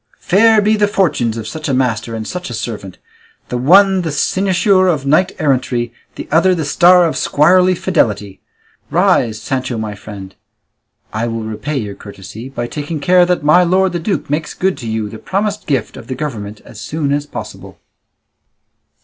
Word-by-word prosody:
Fair 215 Hz, +3 st, +4 dB
be 215 Hz, +2 st, +3 dB
the 205 Hz, -1 st, +2 dB
fortunes 140 Hz, -, 0 dB
of 110 Hz, -, -6 dB
such 155 Hz, -2 st, -5 dB
a 135 Hz, -, +1 dB
master 115 Hz, -3 st, -1 dB
and 110 Hz, -1 st, -5 dB
such 180 Hz, -4 st, -5 dB
a 120 Hz, -, -5 dB
servant, 105 Hz, -5 st, -6 dB, 0.5 s
the 125 Hz, -, -2 dB
one 190 Hz, +7 st, +5 dB
the 165 Hz, -3 st, -3 dB
cynosure 185 Hz, +4 st, +2 dB
of 155 Hz, -6 st, 0 dB
knight 155 Hz, +7 st, +3 dB
errantry, 125 Hz, -4 st, 0 dB, 0.2 s
the -, -, -7 dB
other 180 Hz, +4 st, +4 dB
the 160 Hz, -3 st, -3 dB
star 175 Hz, +4 st, +5 dB
of 165 Hz, -, 0 dB
squirely 180 Hz, +5 st, +3 dB
fidelity! 105 Hz, -, -1 dB, 0.5 s
Rise, 110 Hz, -2 st, +2 dB
Sancho, 130 Hz, +1 st, -3 dB
my 110 Hz, -1 st, -4 dB
friend; 100 Hz, -1 st, -10 dB, 0.8 s
I 110 Hz, +2 st, -1 dB
will 115 Hz, -1 st, -3 dB
repay 110 Hz, +7 st, -4 dB
your 105 Hz, -5 st, -4 dB
courtesy 100 Hz, +5 st, -10 dB
by 120 Hz, -3 st, -4 dB
taking 150 Hz, +5 st, -5 dB
care 180 Hz, +4 st, +4 dB
that 180 Hz, -4 st, 0 dB
my 155 Hz, +4 st, +5 dB
lord 185 Hz, +2 st, +2 dB
the 175 Hz, -, -2 dB
duke 190 Hz, +4 st, -2 dB
makes 150 Hz, +2 st, -3 dB
good 190 Hz, 0 st, 0 dB
to 120 Hz, -, -7 dB
you 110 Hz, -1 st, -2 dB
the 110 Hz, +1 st, -9 dB
promised 205 Hz, -, -2 dB
gift 135 Hz, -7 st, -1 dB
of 115 Hz, -, -11 dB
the 130 Hz, -, -4 dB
government 110 Hz, -9 st, -6 dB
as 105 Hz, -, -11 dB
soon 145 Hz, +3 st, -2 dB
as 145 Hz, 0 st, -2 dB
possible." -, -, -9 dB
145 Hz, 180 wpm, -16 LUFS, 115-180 Hz, 0.8 s, one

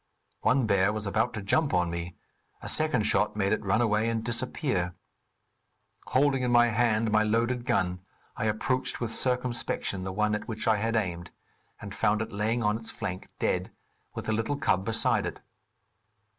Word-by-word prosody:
One 130 Hz, -1 st, +3 dB
bear 100 Hz, -1 st, +3 dB
was 110 Hz, 0 st, -4 dB
about 110 Hz, +3 st, 0 dB
to 105 Hz, -, -5 dB
jump 140 Hz, +8 st, +2 dB
on 90 Hz, -1 st, +1 dB
me, 85 Hz, +1 st, -5 dB, 0.4 s
a -, -, -8 dB
second 155 Hz, -8 st, +2 dB
shot 105 Hz, -1 st, +2 dB
made 100 Hz, -2 st, +1 dB
it -, -, -2 dB
run 100 Hz, +4 st, +2 dB
away 110 Hz, 0 st, +2 dB
and 115 Hz, -1 st, -2 dB
disappear. 120 Hz, -, -2 dB, 1.1 s
Holding 135 Hz, 0 st, +2 dB
in 125 Hz, -, 0 dB
my 120 Hz, 0 st, +5 dB
hand 115 Hz, -1 st, +1 dB
my 110 Hz, 0 st, +4 dB
loaded 120 Hz, +3 st, 0 dB
gun, 90 Hz, 0 st, +1 dB, 0.4 s
I 115 Hz, -, -3 dB
approached 120 Hz, +4 st, -1 dB
with 115 Hz, -2 st, -2 dB
circumspection, 125 Hz, -6 st, -1 dB
the 95 Hz, -, -4 dB
one 105 Hz, +2 st, 0 dB
at 105 Hz, -, -3 dB
which 110 Hz, 0 st, -3 dB
I 110 Hz, -1 st, +4 dB
had 115 Hz, +2 st, -1 dB
aimed, 90 Hz, -5 st, -2 dB, 0.5 s
and -, -, -8 dB
found 105 Hz, +2 st, +1 dB
it -, -, -9 dB
laying 110 Hz, +4 st, -1 dB
on 105 Hz, +1 st, +1 dB
its 115 Hz, -1 st, -9 dB
flank, 95 Hz, -4 st, -5 dB
dead, -, -, -1 dB, 0.5 s
with -, -, -5 dB
the 110 Hz, -, 0 dB
little 115 Hz, +6 st, -1 dB
cub 95 Hz, -9 st, +1 dB
beside 115 Hz, 0 st, +3 dB
it. -, -, -7 dB
110 Hz, 180 wpm, -28 LUFS, 100-120 Hz, 1.1 s, my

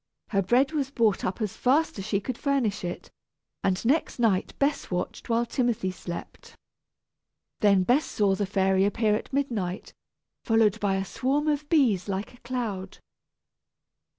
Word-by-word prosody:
Her 195 Hz, -2 st, +2 dB
bread 245 Hz, +9 st, +3 dB
was 285 Hz, -4 st, -1 dB
bought 230 Hz, -7 st, +1 dB
up 185 Hz, +5 st, -2 dB
as 210 Hz, -, -3 dB
fast 275 Hz, -1 st, +1 dB
as 190 Hz, -, -5 dB
she 200 Hz, -2 st, +1 dB
could 235 Hz, +5 st, -4 dB
furnish 250 Hz, -8 st, 0 dB
it, 175 Hz, 0 st, -6 dB, 0.5 s
and 190 Hz, +2 st, 0 dB
next 290 Hz, +7 st, +1 dB
night 220 Hz, -6 st, +1 dB
Bess 285 Hz, +1 st, 0 dB
watched 180 Hz, +5 st, -4 dB
while 230 Hz, +1 st, +2 dB
Timothy 235 Hz, -6 st, 0 dB
slept. 175 Hz, -1 st, -8 dB, 1.0 s
Then 200 Hz, -3 st, +4 dB
Bess 255 Hz, +10 st, +3 dB
saw 200 Hz, -2 st, +1 dB
the 200 Hz, 0 st, -1 dB
fairy 190 Hz, -1 st, +2 dB
appear 210 Hz, +1 st, +2 dB
at 210 Hz, -, -3 dB
midnight, 230 Hz, -10 st, -2 dB, 0.5 s
followed 225 Hz, -2 st, +3 dB
by 200 Hz, -2 st, +1 dB
a 195 Hz, 0 st, -1 dB
swarm 275 Hz, +9 st, -1 dB
of 295 Hz, -1 st, 0 dB
bees 230 Hz, -, +3 dB
like 195 Hz, +4 st, -3 dB
a -, -, -16 dB
cloud. 220 Hz, -7 st, -4 dB
215 Hz, 155 wpm, -27 LUFS, 195-255 Hz, 1.0 s, Then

